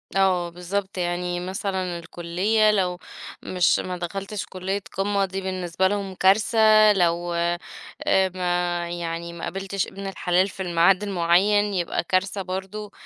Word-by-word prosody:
آه، 185 Hz, -3 st, +2 dB
بالضبط، 190 Hz, +3 st, -4 dB
يعني 175 Hz, 0 st, -1 dB
مثلًا 185 Hz, -1 st, -3 dB
الكلية 185 Hz, +6 st, +1 dB
لو 185 Hz, -3 st, 0 dB, 0.5 s
مش 180 Hz, -2 st, +2 dB
ما 180 Hz, -1 st, -4 dB
دخلتش 195 Hz, +3 st, -5 dB
كلية 190 Hz, +2 st, -3 dB, 0.2 s
قمّة 200 Hz, 0 st, +1 dB
دي 195 Hz, 0 st, -5 dB
بالنسبة 185 Hz, -1 st, -1 dB
لهم 195 Hz, -1 st, -3 dB
كارثة، 215 Hz, +2 st, +5 dB
لو، 175 Hz, -2 st, +1 dB
آآ، 170 Hz, 0 st, 0 dB, 0.8 s
ما 175 Hz, -1 st, -1 dB
يعني 170 Hz, 0 st, -4 dB
ما 170 Hz, -, -9 dB
قابلتش 195 Hz, +1 st, -3 dB
ابن 195 Hz, 0 st, -7 dB
الحلال 185 Hz, 0 st, +1 dB
في 190 Hz, -, -6 dB
الميعاد 180 Hz, +3 st, +3 dB
المعيّن 200 Hz, +2 st, +2 dB
يبقى 175 Hz, -3 st, -1 dB
كارثة 190 Hz, +3 st, 0 dB
برضه. 190 Hz, +3 st, -5 dB
185 Hz, 135 wpm, -24 LUFS, 175-195 Hz, 0.8 s, كارثة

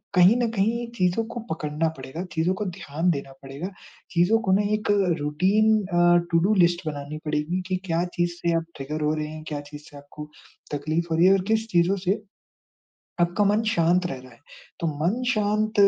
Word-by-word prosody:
कहीं 180 Hz, +5 st, +7 dB
न 235 Hz, -, +2 dB
कहीं 230 Hz, +3 st, 0 dB
चीज़ों 180 Hz, +2 st, +1 dB
को 235 Hz, -, -6 dB
पकड़ना 155 Hz, 0 st, -1 dB
पड़ेगा, 135 Hz, +7 st, -6 dB
चीज़ों 165 Hz, +3 st, +1 dB
को 210 Hz, -, -3 dB
ध्यान 175 Hz, -2 st, -2 dB
देना 140 Hz, -2 st, -4 dB
पड़ेगा। 140 Hz, +7 st, -6 dB, 0.4 s
चीज़ों 180 Hz, +6 st, +3 dB
को 190 Hz, -, 0 dB
ना 200 Hz, -, +4 dB
एक 210 Hz, -1 st, -1 dB, 0.3 s
routine 190 Hz, +9 st, +2 dB
a, 175 Hz, -1 st, +4 dB
to 165 Hz, -, +4 dB
do 195 Hz, +6 st, +2 dB
list 175 Hz, -2 st, +3 dB
बनानी 145 Hz, 0 st, -5 dB
पड़ेगी 150 Hz, +4 st, -1 dB
कि 185 Hz, -, 0 dB
क्या 170 Hz, -1 st, 0 dB
चीज़ 175 Hz, 0 st, +1 dB
से 170 Hz, 0 st, +1 dB
आप 165 Hz, -, -3 dB
ट्रिगर 150 Hz, +3 st, -4 dB
हो 150 Hz, +1 st, +2 dB
रहे 155 Hz, -1 st, -3 dB
हैं, 155 Hz, 0 st, -8 dB
क्या 145 Hz, -1 st, -4 dB
चीज़ 145 Hz, 0 st, -11 dB
से 145 Hz, -, -13 dB
आपको 150 Hz, +1 st, -10 dB, 0.4 s
तकलीफ 155 Hz, +4 st, -1 dB
हो -, -, +2 dB
रही 170 Hz, -, +5 dB
है 190 Hz, -, +7 dB
और 195 Hz, -, +2 dB
किस 220 Hz, 0 st, +1 dB
चीज़ों 175 Hz, 0 st, +3 dB
से 200 Hz, +4 st, +1 dB, 1.0 s
आपका 175 Hz, +4 st, +2 dB
मन 210 Hz, +2 st, +3 dB
शांत 180 Hz, -4 st, +2 dB
रह 135 Hz, -, -4 dB
रहा 130 Hz, 0 st, -15 dB
है? 115 Hz, -, -21 dB, 0.4 s
तो 165 Hz, -, -1 dB, 0.2 s
मन 210 Hz, +9 st, +1 dB
शांत 215 Hz, 0 st, 0 dB
175 Hz, 200 wpm, -25 LUFS, 150-195 Hz, 1.0 s, कहीं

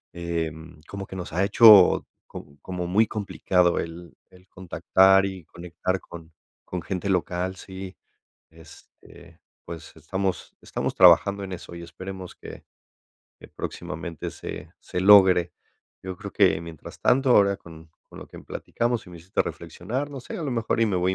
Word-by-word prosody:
em, 80 Hz, -2 st, -5 dB
como 100 Hz, -1 st, -7 dB
que -, -, -10 dB
nos 90 Hz, -2 st, -6 dB
ha 90 Hz, +4 st, 0 dB
hecho 105 Hz, -2 st, +7 dB, 0.2 s
co 70 Hz, 0 st, -12 dB
como 90 Hz, -2 st, -5 dB
muy 105 Hz, +5 st, +3 dB
complicado 90 Hz, -4 st, 0 dB
el 85 Hz, +1 st, -8 dB
el 90 Hz, 0 st, -20 dB
contactar 95 Hz, +1 st, +3 dB
y 95 Hz, -4 st, -8 dB
conectar 90 Hz, +2 st, -4 dB
con 80 Hz, -1 st, -13 dB, 0.3 s
con 90 Hz, -1 st, -5 dB
gente 95 Hz, +2 st, -4 dB
local, 90 Hz, 0 st, -1 dB
sí. 95 Hz, 0 st, -9 dB, 0.6 s
Este, 85 Hz, +1 st, -17 dB, 0.3 s
pues 85 Hz, -1 st, -9 dB
estamos 95 Hz, +2 st, -4 dB
estamos -, -, -3 dB
trabajando 100 Hz, 0 st, +5 dB
en 95 Hz, -1 st, -6 dB
eso 85 Hz, -, -9 dB
y 85 Hz, -, -8 dB
esperemos 95 Hz, +2 st, -9 dB
que -, -, -11 dB, 0.8 s
que -, -, -14 dB
próximamente 80 Hz, 0 st, -6 dB
se 80 Hz, +2 st, -9 dB
se 90 Hz, -, -4 dB
logre. 95 Hz, -3 st, +6 dB, 0.5 s
Yo 95 Hz, -1 st, -6 dB
creo -, -, -9 dB
que -, -, +3 dB
mientras 85 Hz, -2 st, -11 dB
tanto, 135 Hz, +2 st, +2 dB
ahora 100 Hz, -3 st, +5 dB
con 80 Hz, -1 st, -14 dB, 0.2 s
con -, -, -13 dB
lo -, -, -10 dB
que -, -, -12 dB
platicamos, 120 Hz, 0 st, -3 dB
sí 90 Hz, -, -15 dB
me 85 Hz, -, -11 dB
hiciste 90 Hz, +4 st, -1 dB
reflexionar. 125 Hz, +11 st, -5 dB
No 135 Hz, -2 st, -7 dB
sé, 220 Hz, -, -8 dB
a -, -, -5 dB
lo 145 Hz, -, -3 dB
mejor 115 Hz, -1 st, -1 dB
y 115 Hz, -, +4 dB
me 100 Hz, -4 st, 0 dB
voy 90 Hz, +1 st, +1 dB
a -, -, -2 dB
90 Hz, 165 wpm, -25 LUFS, 85-100 Hz, 0.8 s, hecho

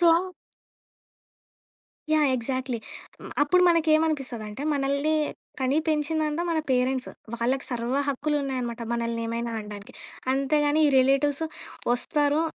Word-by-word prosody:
So 345 Hz, -, +5 dB, 2.1 s
yeah! 305 Hz, -1 st, +4 dB
Exactly 255 Hz, 0 st, -2 dB, 0.6 s
అప్పుడు 360 Hz, +5 st, +4 dB
మనకేమనిపిస్తదంటే, 305 Hz, -9 st, +1 dB
మనల్ని 280 Hz, +2 st, +1 dB, 0.5 s
కని 265 Hz, +3 st, +2 dB
పెంచిందంతా 310 Hz, +1 st, 0 dB
మన 330 Hz, -, +1 dB
పేరెంట్స్, 255 Hz, 0 st, +1 dB, 0.3 s
వాళ్ళకి 255 Hz, +3 st, 0 dB
సర్వ 240 Hz, +1 st, -2 dB
హక్కులున్నాయనమాట. 270 Hz, -4 st, -1 dB
మనల్ని 235 Hz, 0 st, -1 dB
ఏమైనా 235 Hz, +1 st, -2 dB
అనడానికి. 210 Hz, -1 st, -9 dB, 0.4 s
అంతేగాని 290 Hz, +3 st, +2 dB
ఈ -, -, +3 dB
రిలేటివ్స్ 275 Hz, +3 st, +3 dB, 0.5 s
ఒస్తారు 290 Hz, +4 st, +1 dB
275 Hz, 95 wpm, -26 LUFS, 245-300 Hz, 2.1 s, So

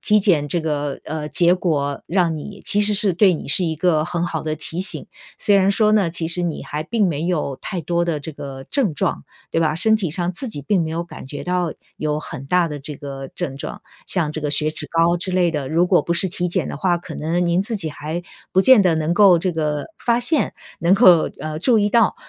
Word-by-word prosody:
体 210 Hz, -1 st, +3 dB
检 170 Hz, -8 st, +2 dB
这 170 Hz, +4 st, -1 dB
个， 145 Hz, -3 st, -3 dB
呃， 155 Hz, -1 st, -5 dB
结 170 Hz, +4 st, +3 dB
果 145 Hz, -6 st, -2 dB
让 170 Hz, -2 st, +1 dB
你 200 Hz, +6 st, -9 dB
其 205 Hz, -, +2 dB
实 210 Hz, 0 st, +4 dB
是 200 Hz, -2 st, +6 dB
对 185 Hz, +1 st, +4 dB
你 -, -, -7 dB
是 180 Hz, +6 st, +3 dB
一 160 Hz, -2 st, -1 dB
个 155 Hz, -1 st, +1 dB
很 175 Hz, 0 st, -2 dB
好 165 Hz, -2 st, -3 dB
的 155 Hz, -1 st, -2 dB
提 160 Hz, +3 st, -5 dB
醒， 190 Hz, -, -1 dB, 0.3 s
虽 205 Hz, -1 st, +3 dB
然 195 Hz, 0 st, +3 dB
说 215 Hz, +1 st, +3 dB
呢， 210 Hz, -4 st, +3 dB
其 165 Hz, -1 st, -2 dB
实 175 Hz, +1 st, 0 dB
你 170 Hz, -3 st, -3 dB
还 150 Hz, +1 st, -5 dB
并 210 Hz, +2 st, +1 dB
没 155 Hz, -1 st, -2 dB
有 155 Hz, -6 st, -1 dB
太 185 Hz, -4 st, -4 dB
多 170 Hz, +2 st, 0 dB
的 165 Hz, -3 st, -2 dB
这 160 Hz, -, -6 dB
个 135 Hz, -2 st, -8 dB
症 245 Hz, -, +1 dB
状， 190 Hz, +3 st, -2 dB, 0.3 s
对 165 Hz, -, 0 dB
吧， 155 Hz, -2 st, +1 dB
身 220 Hz, +6 st, +3 dB
体 200 Hz, -5 st, -2 dB
上 175 Hz, +2 st, -2 dB
自 195 Hz, +9 st, -3 dB
己 145 Hz, -, -5 dB
并 185 Hz, +5 st, +1 dB
没 160 Hz, -, -4 dB
有 170 Hz, -, -2 dB
感 170 Hz, -, -11 dB
觉 145 Hz, +2 st, -7 dB
到 180 Hz, -3 st, -1 dB, 0.2 s
有 150 Hz, 0 st, -2 dB
很 135 Hz, -3 st, -8 dB
大 175 Hz, +2 st, +2 dB
的 150 Hz, -, -6 dB
这 145 Hz, +2 st, -7 dB
个 135 Hz, -1 st, -7 dB
症 135 Hz, -1 st, -4 dB
状， -, -, -7 dB, 0.2 s
像 165 Hz, -5 st, 0 dB
这 155 Hz, -, -5 dB
个 150 Hz, -, -2 dB
血 150 Hz, +1 st, +2 dB
脂 155 Hz, -1 st, -7 dB
高 165 Hz, +1 st, +3 dB
之 185 Hz, +2 st, -2 dB
类 180 Hz, -2 st, +2 dB
的， 145 Hz, -4 st, -3 dB
如 170 Hz, +3 st, +2 dB
果 180 Hz, -, +4 dB
不 170 Hz, -, -2 dB
是 185 Hz, +2 st, +1 dB
体 180 Hz, 0 st, -2 dB
检 170 Hz, -, -1 dB
的 -, -, -5 dB
话， 175 Hz, +3 st, +1 dB
可 170 Hz, -2 st, -9 dB
能 170 Hz, +3 st, -1 dB
您 170 Hz, +1 st, +2 dB
自 220 Hz, +4 st, -2 dB
己 175 Hz, -6 st, -3 dB
还 155 Hz, +4 st, -5 dB, 0.3 s
不 190 Hz, -, +4 dB
见 250 Hz, +2 st, +7 dB
得 180 Hz, -4 st, +3 dB
能 160 Hz, +1 st, 0 dB
够 185 Hz, -3 st, +6 dB
这 185 Hz, -, 0 dB
个 150 Hz, -3 st, -2 dB
发 235 Hz, 0 st, +1 dB
现， 285 Hz, +4 st, +1 dB, 0.2 s
能 170 Hz, +3 st, +3 dB
够， 185 Hz, -6 st, +6 dB
呃， 155 Hz, 0 st, -4 dB
注 225 Hz, +5 st, +3 dB
意 205 Hz, -, +1 dB
到。 230 Hz, -3 st, +3 dB
170 Hz, 265 characters per minute, -20 LUFS, 155-185 Hz, 0.3 s, 见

